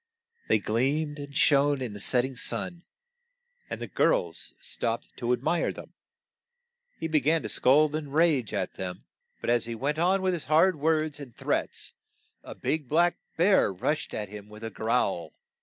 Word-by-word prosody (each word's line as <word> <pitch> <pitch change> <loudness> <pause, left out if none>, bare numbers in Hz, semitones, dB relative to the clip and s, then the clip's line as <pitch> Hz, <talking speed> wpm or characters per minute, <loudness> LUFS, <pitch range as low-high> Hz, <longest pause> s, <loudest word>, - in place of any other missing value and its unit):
They - - +4
gleamed 140 +8 0
and 140 0 -6
shone 145 -1 +4
in 125 -5 -4
the 105 - -8
set 125 +5 +3
ting 130 0 -5
sun, 175 +7 -2 0.8
and - - -4
the - - -4
girls - - 0
stopped - - -3
to 120 -1 -1
ad 125 0 0
mire 170 +2 +1
them. - - -11 1.1
He 160 - -2
be 155 -1 +3
gan 155 +4 +2
to - - -4
scold 150 +3 +4
and 150 -3 -4
rage 150 - +2
at - - -2
them, 90 -1 -6 0.4
but - - 0
as 120 -1 +2
he 115 0 -4
went 145 +6 -1
on 190 +3 +2
with 185 -1 +2
his 170 - -4
hard 160 +6 +5
w 155 -1 -3
r 160 -1 +3
ords 150 -2 -6
and 130 -5 -10
threats - - -2 0.5
a - - -9
big 150 -5 -2
black 170 +3 +3 0.2
bear 185 - +4
rushed 150 +12 -2
at 105 -2 -4
him 105 0 -10
with 105 +1 -12
a 115 - -4
growl. 110 -5 -1
145 Hz, 190 wpm, -28 LUFS, 120-160 Hz, 1.1 s, hard